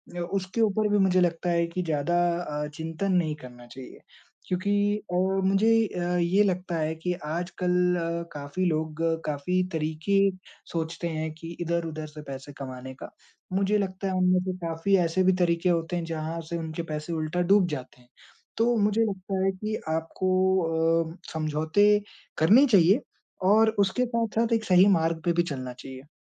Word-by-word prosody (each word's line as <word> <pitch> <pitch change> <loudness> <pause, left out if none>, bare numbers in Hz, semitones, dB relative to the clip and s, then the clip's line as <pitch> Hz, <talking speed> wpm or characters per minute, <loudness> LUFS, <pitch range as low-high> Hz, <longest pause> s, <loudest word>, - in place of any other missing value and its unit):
अ, - - -4
उसके 185 +5 -2
ऊपर 215 0 +2
भी 205 - +3
मुझे 185 -2 +3
लगता 175 0 0
है 170 0 +2
कि 180 +2 -3
ज़्यादा 160 +2 0 0.5
अ, - - -5
चिंतन 165 +4 -3
नहीं 160 -4 +1
करना 120 -1 -13
चाहिए। 130 +1 -11 0.5
क्योंकि 205 +3 +1
अ, - - -1 0.3
मुझे 195 +4 +3 0.2
अ, 180 -1 -2
ये 180 +4 +3
लगता 180 -2 -1
है 155 0 -1
कि 180 +3 -2
आजकल 180 +3 -2 0.6
काफ़ी 145 +6 -3
लोग 160 -1 -1 0.2
काफ़ी 155 +5 0
तरीके 160 +5 0 0.5
सोचते 165 +1 -3
हैं 160 -1 -3
कि 165 +1 -9
इधर-उधर 165 -2 -2
से 150 0 -10
पैसे 135 +1 -7
कमाने 130 -1 -7
का। - - -9 0.4
मुझे 200 +2 +2
लगता 195 -1 -3
है 190 - -1
उनमें 185 0 +3
से 185 - -2
काफ़ी 170 +3 0
ऐसे 165 +3 0
भी 190 0 +4
तरीके 170 +1 +2
होते 170 +1 0
हैं 170 - -2
जहाँ 165 0 -4
से 170 - -2
उनके 160 0 -4
पैसे 150 +2 -4
उल्टा 160 +3 -1
डूब 200 -3 +5
जाते 130 -3 -7
हैं। 125 - -25 0.5
तो 235 +1 +3
मुझे 210 +2 +2
लगता 190 -1 -3
है 195 - +3
कि 215 +3 -4
आपको 165 +4 -1 0.8
अ, - - -17 0.2
समझौते 160 +5 +1 0.5
करने 215 - +6
चाहिए 200 - +5 0.5
और 220 +1 +5
उसके 200 +6 +2
साथ-साथ 230 -1 0
एक 225 -1 +1
सही 185 +1 +6
मार्ग 165 0 -1
पे 170 - +2
भी 175 0 +2
चलना 130 -1 -6
चाहिए। 130 +2 -11
175 Hz, 170 wpm, -26 LUFS, 160-195 Hz, 0.8 s, करने